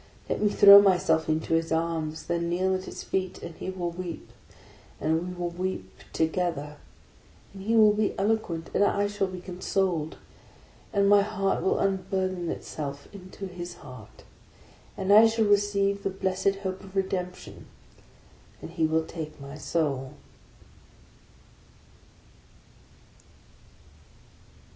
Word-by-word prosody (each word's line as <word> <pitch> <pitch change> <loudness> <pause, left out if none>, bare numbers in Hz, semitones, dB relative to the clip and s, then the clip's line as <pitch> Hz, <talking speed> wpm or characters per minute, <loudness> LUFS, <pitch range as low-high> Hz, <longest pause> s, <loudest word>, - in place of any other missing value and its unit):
Let - - -2
me 210 - +3
throw 200 0 +9
myself 180 -5 +2
into 155 +1 0
his 165 0 +1
arms; 160 -1 -1
then 170 0 -2
kneel 185 +2 +1
at 185 0 -3
his - - -8
feet, 185 -1 -3
and 170 - -7
he 185 - -6
will 180 -2 -3
weep, 175 -1 -7 0.7
and 160 +4 0
we 180 - -5
will 175 -1 -3
weep 175 - -4 0.2
together; 160 -3 -1 0.8
and 195 - -10
he 220 +4 0
will 215 -2 +6
be* 210 -1 -1
eloquent, 195 -6 -1
and - - +3
I 205 0 +2
shall 205 -1 -1
be 185 -1 -7
consoled, 180 -3 -2 0.7
and 200 -1 +2
my 205 0 +6
heart 200 -1 -1
will - - +1
un 195 -1 0
burthen 185 -3 -1
itself 140 -3 -6
into 195 0 -9
his 175 -1 -7
heart, 130 -2 -12 0.4
— - - -27
and 195 +1 +2
I 220 +2 +9
shall 225 0 +1
receive 200 -1 +2
the 195 - -1
blessed 190 +1 0
hope 190 -1 -4
of 190 0 -13
Redemption, 185 -2 -4 0.9
and - - -9
he 165 -2 +1
will 160 0 +1
take 155 -3 -7
my 140 +1 -9
Soul! 145 -4 -2
185 Hz, 140 wpm, -27 LUFS, 165-195 Hz, 0.9 s, throw